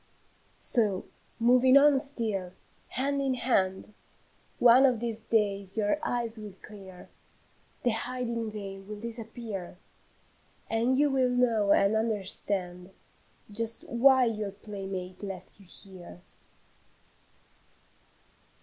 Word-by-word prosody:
"So, 210 -6 +3 0.3
moving 250 +3 +5
on 285 -1 +6
still, 220 -10 -3 0.3
hand 280 +2 -1
in 265 -2 0
hand, 205 -5 0 0.6
One 245 +2 +7
of 245 -4 0
these 225 -1 -3
days 200 -2 0
your 215 +7 +1
eyes 235 -2 -2
will 210 -2 -8
clear, 195 -4 -12 0.7
The 245 - +2
hiding 235 0 -3
veil 200 -2 -7
will 205 +2 -9
disappear, 225 -5 -7 0.9
And 235 +3 +2
you 290 0 +3
will 260 -2 +2
know 230 -5 +2
and 200 +2 +4
understand 195 -4 -2 0.6
Just 225 +2 -1
why 260 +1 +5
your 215 -3 -2
playmate 195 -3 -7
left 195 -1 -8
you 195 - -17
here." 180 -1 -11
220 Hz, 105 wpm, -29 LUFS, 195-245 Hz, 0.9 s, One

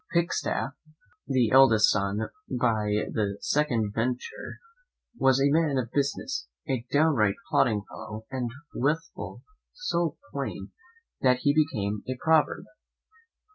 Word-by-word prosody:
Pikestaff, 170 -5 0 0.6
the 125 -5 +2
eldest 125 -5 +6
son 100 +2 -1 0.2
by 110 -4 +1
the 100 -2 -1
second 120 -9 0
venter, 120 +3 -3 0.6
was 135 - +3
a 140 +1 +3
man 155 -3 +2
of 120 -2 -2
business, 140 - -1 0.2
a 130 -3 -1
downright 140 -10 +3 0.2
plodding 105 -3 +3
fellow, 110 +1 -8
and 125 -2 -2 0.2
withal 160 +5 -2 0.3
so 175 - -1
plain, - - -5 0.5
that 125 -1 +3
he 145 - +4
became 105 -10 0
a 130 - -2
proverb. 160 +2 +2
125 Hz, 115 wpm, -27 LUFS, 110-145 Hz, 0.6 s, eldest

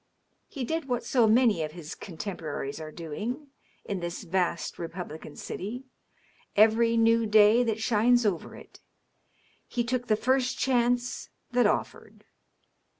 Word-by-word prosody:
He 270 - -5
did 320 +5 -2
what 245 -2 -1
so 240 -4 +3
many 225 -5 +4
of 155 -1 -3
his 165 -3 -8
contemporaries 160 -5 -6
are 155 -1 -7
doing, 215 - -5 0.4
in 200 -2 -3
this 175 +3 -5
vast 180 -1 -1
republican 165 -3 -7
city, 230 +7 -6 0.7
every 225 +2 +4
new 230 0 +4
day 215 +2 +6
that 225 -3 0
shines 240 +2 +3
over 190 -6 -1
it: - - -14 0.9
he 240 - -1
took 245 +1 -2
the 215 - +3
first 255 +2 +1
chance 245 -1 0 0.2
that 245 -3 +4
offered. 210 - -3
220 Hz, 135 wpm, -28 LUFS, 175-245 Hz, 0.9 s, day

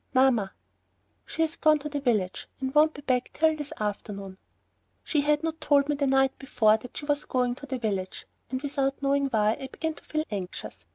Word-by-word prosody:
"Mamma." 245 -7 +4 0.8
"She 325 - 0
has 320 +1 -1
gone 310 -1 +5
to 295 +1 -6
the 290 -1 -2
village 215 -9 0
and 265 0 -3
won't 305 +1 +5
be 285 - -9
back 255 -2 +1
till 315 0 +3
this 295 -2 -6
afternoon." 200 -2 -4 0.6
She 300 - +1
had 295 +1 +2
not 325 0 -3
told 285 -1 +3
me 295 - +2
the 280 -1 0
night 270 0 +3
before 225 -5 +3
that 240 +2 -11
she 290 - -5
was 290 0 +1
going 250 -1 +1
to 285 - -9
the 260 -1 -2
village, 200 -5 -3 0.2
and 260 +2 -3
without 275 -1 -1
knowing 280 0 +2
why, 215 -3 +2
I 265 - -4
began 320 +4 -3
to - - -14
feel 310 0 -1
anxious. 190 -3 -6
270 Hz, 210 wpm, -27 LUFS, 225-295 Hz, 0.8 s, gone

